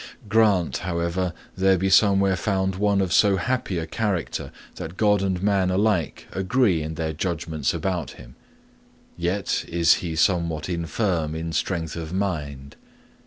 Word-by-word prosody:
'Grant, 100 - +3
however, 85 +1 -2 0.2
there 95 0 +3
be 95 +2 0
somewhere 100 -1 +4
found 95 0 0
one 100 0 +2
of 95 -2 -1
so 100 -2 +5
happy 115 -1 -1
a 80 - -2
character 95 0 -2 0.3
that 80 +3 -7
God 105 -2 +3
and 95 -1 -1
man 100 -2 +2
alike 95 -3 0
agree 95 -2 +1
in 80 +1 -5
their 80 0 -2
judgments 80 -3 -2
about 90 -8 -3
him; - - -14 0.8
yet 90 +3 -1
is 85 -1 +4
he 85 -3 -4
somewhat 85 -2 +1
infirm 85 -2 -1
in 80 0 -4
strength 80 -1 -2
of 85 0 -6
mind. 75 -8 -3
90 Hz, 145 wpm, -24 LUFS, 80-100 Hz, 0.8 s, so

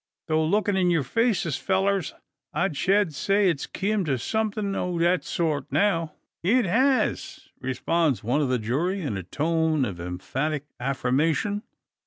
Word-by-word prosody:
Tho 160 -1 +2
lookin' 205 +4 +1
in 185 -2 +3
yur 165 -4 +2
faces, 200 - +1
fellurs, 195 -2 0 0.4
I 175 -1 +1
shed 190 +4 +2
say 195 +5 +2
it's 145 -4 -4
kim 205 0 -1
to 135 -4 0
somethin' 215 - -1
o' 180 -2 -2
that 170 -2 +2
sort 150 -5 -2
now." 165 -6 +1 0.3
"It 230 +7 +3
has!" 260 +8 +1
responds 140 +2 0
one 125 +7 +1
of 140 - 0
the 130 - +2
jury, 150 - -1
in 140 - -2
a 95 - -3
tone 155 - 0
of 95 -6 -5
emphatic 135 - -3
affirmation. 145 - 0
165 Hz, 150 wpm, -25 LUFS, 140-195 Hz, 0.4 s, in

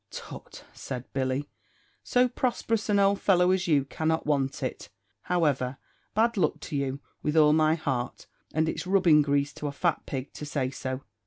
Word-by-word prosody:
"Tut," - - -10
said 130 -2 -6
Billy, 135 +1 -1 0.6
"so 250 0 +3
prosperous 235 -3 -1
an 205 - +4
old 200 0 +3
fellow 180 -2 +4
as 185 -1 +1
you 145 -5 +3
cannot 160 +3 -1
want 140 -2 0
it; 130 - -4 0.4
however, 140 -7 +1 0.4
bad 230 +1 +2
luck 190 - +1
to 155 - -6
you, 140 0 -2 0.2
with 150 +1 0
all 150 -1 +6
my 155 0 +4
heart! 130 -6 -3 0.3
and 160 +1 +1
it's 170 - -3
rubbing 180 -6 +5
grease 140 0 +1
to 150 - -5
a - - -2
fat 165 +3 -1
pig 135 0 -5
to - - -8
say 140 -3 -2
so. 130 0 -5
150 Hz, 175 wpm, -27 LUFS, 140-180 Hz, 0.6 s, all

